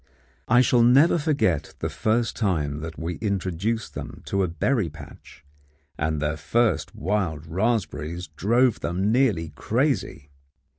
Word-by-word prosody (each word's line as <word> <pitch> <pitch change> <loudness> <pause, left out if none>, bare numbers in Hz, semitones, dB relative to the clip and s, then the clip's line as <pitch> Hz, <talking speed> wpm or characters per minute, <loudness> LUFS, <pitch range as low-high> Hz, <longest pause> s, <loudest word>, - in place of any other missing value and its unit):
I 125 - +5
shall 125 -1 +3
never 135 +8 +5
forget 140 - 0
the - - -2
first 115 +2 0
time 75 -9 -1
that 80 0 -7
we 85 0 -4
introduced 100 +2 -2
them - - -8
to 100 - 0
a 95 - +2
berry 90 - 0
patch; 75 -1 -14 0.5
and 75 0 -1
their 75 +1 -1
first 115 +10 0
wild 85 -4 -2
raspberries 90 -3 -2
drove 115 - +2
them 95 +5 -1
nearly 110 - +2
crazy. 70 -1 -1
95 Hz, 135 wpm, -24 LUFS, 80-115 Hz, 0.5 s, I